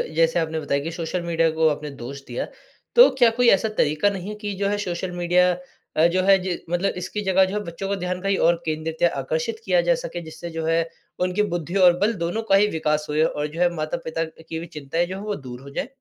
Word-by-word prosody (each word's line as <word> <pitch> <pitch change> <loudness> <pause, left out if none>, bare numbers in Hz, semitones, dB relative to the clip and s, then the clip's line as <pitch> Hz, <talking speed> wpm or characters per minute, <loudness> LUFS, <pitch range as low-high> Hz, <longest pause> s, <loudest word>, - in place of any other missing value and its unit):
जैसे 165 +1 +3
आपने 160 -1 -1
बताया 140 -1 -1
कि 165 - -3
सोशल 170 +2 -3
मीडिया 165 -1 +2
को 160 - +5
आपने 150 0 -3
दोष 135 +3 -7
दिया। 120 - -3 0.5
तो 485 - +9
क्या 240 -2 +7
कोई 245 - +5
ऐसा 195 +3 +3
तरीका 155 +7 +3
नहीं 195 0 -5
है 210 - -5
कि 205 -1 -3
जो 200 - +2
है 205 - 0
सोशल 180 0 -3
मीडिया 180 +1 +3 0.5
अ, 160 - +5
जो 185 +2 +1
है 195 0 +6
जि 180 -2 -2
मतलब 175 +3 0
इसकी 185 +4 -4
जगह 190 0 +4
जो 190 +2 -4
है - - +1
बच्चों 170 +3 -5
को 200 - 0
ध्यान 180 0 -2
कहीं 195 0 +1
और 170 - +5
केंद्रित 160 0 -3
या 175 - +5
आकर्षित 480 -3 -2
किया - - +3
जा - - +5
सके। 175 - -5
जिससे 160 +1 -8
जो 160 - -2
है 165 +1 +2 0.5
उनकी 190 +3 +1
बुद्धि 170 +2 -4
और 175 0 +6
बल 215 +3 +2
दोनों 175 +7 -1
का 195 - +8
ही 205 +1 +5
विकास 150 -1 0
हो 150 - -2
जाए 155 +1 +4
और 150 -1 -1
जो 155 +3 -9
है 175 - +5
माता-पिता 160 +1 -3
की 160 0 -8
भी 170 - -6
चिंताएँ 155 +5 -1
जो 185 - -5
है 195 - -6
वो 210 -1 -2
दूर 125 -2 -9
हो 140 - -11
जाएँ? 140 - -3
175 Hz, 255 wpm, -23 LUFS, 160-195 Hz, 0.5 s, तो